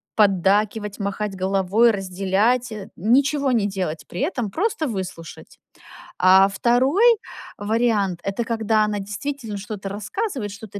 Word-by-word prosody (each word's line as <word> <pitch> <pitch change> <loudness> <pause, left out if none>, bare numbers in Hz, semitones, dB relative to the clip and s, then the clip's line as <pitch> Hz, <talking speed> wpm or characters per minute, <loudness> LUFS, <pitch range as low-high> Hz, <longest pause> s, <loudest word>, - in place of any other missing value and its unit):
поддакивать, 205 +1 +2
махать 200 0 -3
головой, 195 +4 +2
разделять, 200 +5 0
э, 205 -2 -8
ничего 275 - +2
не 225 -4 +2
делать 185 -6 -4
при - - -6
этом, 250 - -2
просто 345 - -1
выслушать. 185 - -7 0.6
А, 190 +1 +6
2 265 - +3 0.4
вариант, 205 -4 0
это 200 +4 -2
когда 220 -1 +1
она 210 -1 -2
действительно 215 +2 -5
что-то 200 -1 -6
рассказывает, 210 - -4
что-то 200 0 -9
210 Hz, 120 wpm, -22 LUFS, 195-240 Hz, 0.6 s, А